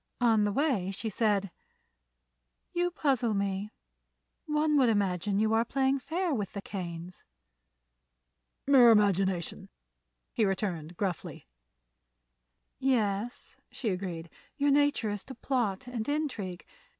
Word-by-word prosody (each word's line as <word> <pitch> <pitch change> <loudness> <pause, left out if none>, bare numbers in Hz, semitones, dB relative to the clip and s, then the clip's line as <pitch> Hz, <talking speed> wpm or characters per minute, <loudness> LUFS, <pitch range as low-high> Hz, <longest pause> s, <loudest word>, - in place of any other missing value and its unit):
On 225 -3 +4
the 205 - +1
way 245 - +1
she 195 +3 -4
said: 205 -3 +1 1.2
"You 350 0 +1
puzzle 260 -10 +1
me. 200 +1 -1 0.8
One 300 0 +2
would 255 -3 +5
imagine 200 -2 +1
you 220 +1 +2
are 225 +1 +4
playing 270 +2 +1
fair 335 +5 -1
with 205 -6 -3
the 200 - -4
Kanes." 175 -2 -6 1.4
"Mere 265 -4 +7
imagination," 195 -5 +2 0.6
he 225 - +1
returned, 180 -5 -2
gruffly. 190 -4 -3 1.3
"Yes," 235 -4 -1
she 235 - -3
agreed; 180 -3 -4 0.3
"your 285 -1 +3
nature 285 -6 +2
is 205 -1 -4
to 265 - -9
plot 235 -6 -1
and 245 -1 -4
intrigue. 240 - -3
215 Hz, 115 wpm, -30 LUFS, 195-265 Hz, 1.4 s, Mere